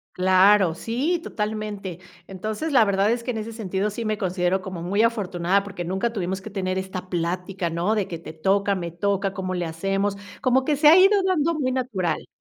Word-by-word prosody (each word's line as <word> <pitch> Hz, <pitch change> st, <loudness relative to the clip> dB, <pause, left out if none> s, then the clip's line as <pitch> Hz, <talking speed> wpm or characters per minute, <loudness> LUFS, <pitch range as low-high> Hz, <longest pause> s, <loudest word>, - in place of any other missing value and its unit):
Claro, 185 Hz, -1 st, +5 dB
sí, 265 Hz, -, -1 dB
totalmente. 210 Hz, -4 st, -4 dB, 0.3 s
Entonces, 215 Hz, -, -4 dB
la 240 Hz, -, +7 dB
verdad 200 Hz, 0 st, +2 dB
es 235 Hz, 0 st, -1 dB
que 250 Hz, -, -2 dB
en 225 Hz, -, -4 dB
ese 220 Hz, +1 st, -5 dB
sentido 200 Hz, -2 st, -2 dB
sí 220 Hz, +3 st, -5 dB
me 215 Hz, -1 st, -1 dB
considero 185 Hz, 0 st, 0 dB
como 185 Hz, -3 st, -6 dB
muy 195 Hz, +5 st, 0 dB
afortunada 195 Hz, -4 st, +1 dB
porque 195 Hz, -4 st, -6 dB
nunca 190 Hz, +6 st, -1 dB
tuvimos 190 Hz, -2 st, -3 dB
que 215 Hz, -, -8 dB
tener 185 Hz, -2 st, -2 dB
esta 190 Hz, -1 st, -5 dB
plática, 180 Hz, +1 st, -2 dB
¿no? 170 Hz, +6 st, 0 dB
De 205 Hz, -3 st, 0 dB
que 170 Hz, -, -5 dB
te 160 Hz, -, -9 dB
toca, 195 Hz, +5 st, +1 dB
me 170 Hz, -2 st, -4 dB
toca, 195 Hz, +2 st, -1 dB
¿cómo 185 Hz, -1 st, -3 dB
le 175 Hz, -1 st, -2 dB
hacemos? 195 Hz, +5 st, -1 dB, 0.3 s
Como 260 Hz, +1 st, +2 dB
que 300 Hz, -, +2 dB
se 295 Hz, +2 st, +4 dB
ha 330 Hz, -, +8 dB
ido 390 Hz, +2 st, +6 dB
dando 335 Hz, -4 st, +1 dB
muy 275 Hz, -5 st, -1 dB
natural. 210 Hz, -11 st, -2 dB
195 Hz, 205 wpm, -24 LUFS, 185-220 Hz, 0.3 s, ha